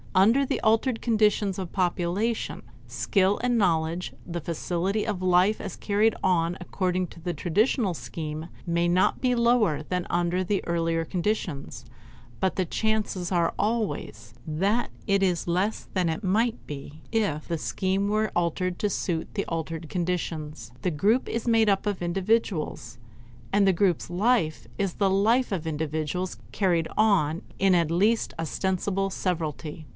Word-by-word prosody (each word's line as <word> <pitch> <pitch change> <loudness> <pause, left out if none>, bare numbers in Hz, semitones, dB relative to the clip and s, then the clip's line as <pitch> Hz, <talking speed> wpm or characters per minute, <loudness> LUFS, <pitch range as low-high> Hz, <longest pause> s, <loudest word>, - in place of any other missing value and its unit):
Under 225 +9 +5
the - - -1
altered 225 +2 +2
conditions 210 -4 +2
of 185 -3 -5
population, 185 +5 -1 0.2
skill, 185 - +1
and 245 -1 +2
knowledge, 170 -3 +1
the 170 -1 -4
facility 180 +6 -1
of 205 -4 -2
life 185 +3 +3
as - - -6
carried 210 +2 +2
on 175 -1 +2
according 185 0 -1
to 165 - -13
the 175 +1 -2
traditional 205 - +1
scheme 155 0 -6 0.2
may 170 0 +2
not 180 +2 +2
be 250 -1 +2
lower 235 -10 +3
than 180 +2 -2
under 175 +1 +1
the 195 +2 -1
earlier 165 -1 0
conditions; 165 - -3 0.6
but 190 - +1
the 185 - +1
chances 210 -2 -1
are 170 -2 +2
always 200 - -2
that 195 +10 0 0.2
it 200 -1 +3
is 180 -3 +1
less 185 +5 0
than 170 -4 0
might 220 +5 +2
be 145 +1 -8
if 200 -10 0
the 165 -2 -2
scheme 190 +5 0
were 215 +1 +1
altered 175 +1 0
to 210 - +1
suit 170 -3 -2
the 200 - -1
altered 165 0 -4
conditions. 155 - -3
The 180 - 0
group 205 - +2
is 230 +1 -3
made 225 -2 +4
up 195 0 +1
of 205 -3 -2
individuals, 175 - -1 0.6
and 200 0 +4
the 195 - +5
group's 180 -3 +1
life 175 - +1
is 195 -3 -1
the 195 -2 +2
life 220 +5 +3
of 170 -4 -3
individuals 160 +3 -2
carried 175 -5 +1
on 185 -7 +3 0.2
in 195 -1 +4
at 170 -3 +2
least 205 +7 +2
ostensible 190 +4 -1
severalty. 160 -4 -3
185 Hz, 150 wpm, -26 LUFS, 165-205 Hz, 0.6 s, Under